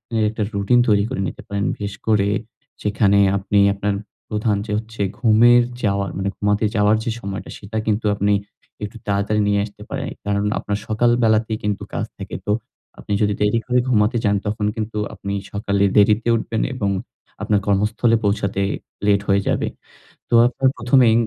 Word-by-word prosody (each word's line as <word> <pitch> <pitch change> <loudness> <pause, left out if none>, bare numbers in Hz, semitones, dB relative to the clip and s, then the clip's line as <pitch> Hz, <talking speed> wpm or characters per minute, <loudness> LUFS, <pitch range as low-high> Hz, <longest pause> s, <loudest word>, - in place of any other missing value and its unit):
এর 110 - +2
১ - - -7
টা 105 - +1
রুটিন 100 +5 +3
তৈরি 105 -2 +4
করে 130 - -3
নিতে - - -7
পারেন। 100 0 -2
বিশেষ 100 -1 -5
করে 105 -3 +3 0.6
যেখানে 105 -1 +3 0.2
আপনি 100 +1 +1 0.2
আপনার 100 0 -1 0.3
প্রধান 105 -1 0
যে 110 - -6
হচ্ছে 110 0 -6 0.2
ঘুমের 120 +1 +6 0.2
যাওয়ার 100 -1 0
মানে 95 +1 -1
ঘুমাতে 105 +1 +1
যাওয়ার 105 0 +4
যে 115 - -1
সময়টা, 100 -3 -6
সেটা 105 +2 -6
কিন্তু 105 +1 0
আপনি 100 +1 +1 0.5
একটু 105 +2 -6
তাড়াতাড়ি 100 +1 +1
নিয়ে 100 0 +2
আসতে 105 0 -14
পারেন। 135 0 -3 0.2
কারণ, 100 0 0
আপনার 100 -1 -2
সকাল 110 +3 +2
বেলাতেই 110 0 +2
কিন্তু 105 -2 -2
কাজ - - -1
থাকে। - - -7
তো 105 - 0 0.5
আপনি 105 - -4
যদি 105 -1 +2
দেরি 105 +2 +2
করে 125 0 +2
ঘুমাতে 115 0 +3
যান, 105 -1 +2
তখন 105 0 -1
কিন্তু 110 -1 -4 0.2
আপনি 100 - -5 0.2
সকালে 100 -1 0
দেরিতে 105 +2 +4
উঠবেন 110 -1 -2
এবং 105 -6 -1 0.5
আপনার 105 -1 +2
কর্মস্থলে 105 +3 +2
পৌঁছাতে 100 -1 0 0.4
লেট 100 -1 +3
হয়ে 100 0 +3
যাবে। - - 0 0.6
তো - - -3
আপনার 130 +1 +1
প্রথমেই 120 -1 +4
105 Hz, 170 wpm, -21 LUFS, 100-110 Hz, 0.6 s, ঘুমের